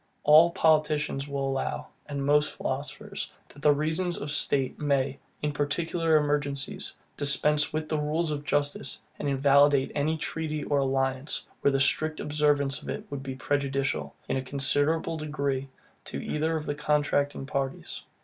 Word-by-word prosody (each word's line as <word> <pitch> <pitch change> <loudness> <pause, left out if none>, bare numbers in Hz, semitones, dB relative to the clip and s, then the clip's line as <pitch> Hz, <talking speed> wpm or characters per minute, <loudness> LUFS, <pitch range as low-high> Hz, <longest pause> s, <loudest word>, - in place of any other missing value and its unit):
All 155 +3 +8
politicians 155 -4 +2
will 140 -1 -2
allow, 135 0 -2 0.2
and 140 -2 -3
most 150 +1 +3
philosophers, - - -5 0.2
that 145 +1 +3
reasons 160 +5 0
of 145 - -4
state 135 -3 +1
may, 140 -2 0 0.2
in 150 - +1
particular 160 +3 0
emergencies, 145 -2 0 0.2
dispense 150 +1 +2
with 155 0 -2
the 155 -1 -1
rules 155 +2 0
of 145 -1 -3
justice, 145 -2 0 0.2
and 145 - -1
invalidate 140 0 +4
any 155 +2 0
treaty 155 -1 -3
or 145 - +1
alliance, 135 +1 -1 0.2
where - - +4
the 135 - +1
strict 155 +3 +1
observance 145 -2 +1
of - - -9
it - - -4
would 140 -1 -4
be 135 -1 -5
prejudicial, 140 0 -1
in - - 0
a - - -1
considerable 145 +4 +1
degree, 140 -3 -2 0.4
to 70 - -5
either 160 - -1
of 155 - -5
the 145 - -1
contracting 145 -2 0
parties. 135 -1 -3
145 Hz, 150 wpm, -28 LUFS, 140-150 Hz, 0.4 s, All